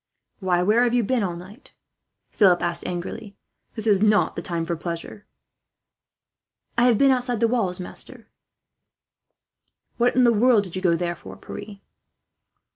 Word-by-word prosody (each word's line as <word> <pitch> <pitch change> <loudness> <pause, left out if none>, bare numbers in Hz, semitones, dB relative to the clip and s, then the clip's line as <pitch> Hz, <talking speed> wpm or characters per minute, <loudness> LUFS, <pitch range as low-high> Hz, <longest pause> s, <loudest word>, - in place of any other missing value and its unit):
"Why, 180 -3 +1
where 215 +5 +3
have 245 0 +1
you 240 - +2
been 250 +3 0
all 180 -4 -2
night?" 190 +9 -13 0.6
Philip 185 -4 +3
asked 170 0 -2
angrily. 180 +3 -6 0.4
"This 220 -2 -4
is 205 -3 +3
not 210 -1 +3
the - - -4
time 170 -3 -3
for 170 0 -2
pleasure." 170 +4 -7 1.5
"I 235 - +3
have 240 -3 +4
been 275 +2 +5
outside 245 -2 0
the 230 - +3
walls, 215 -7 -1
master," 180 - -7
Pierre - - -18
said. - - -41 1.7
"What 245 +1 +2
in 255 - +4
the 235 -1 +5
world 225 -1 +4
did 185 -3 -10
you 185 - -3
go 175 -3 +3
there 175 0 -2
for, - - -12
Pierre?" 205 -1 -10
205 Hz, 170 wpm, -23 LUFS, 180-235 Hz, 1.7 s, been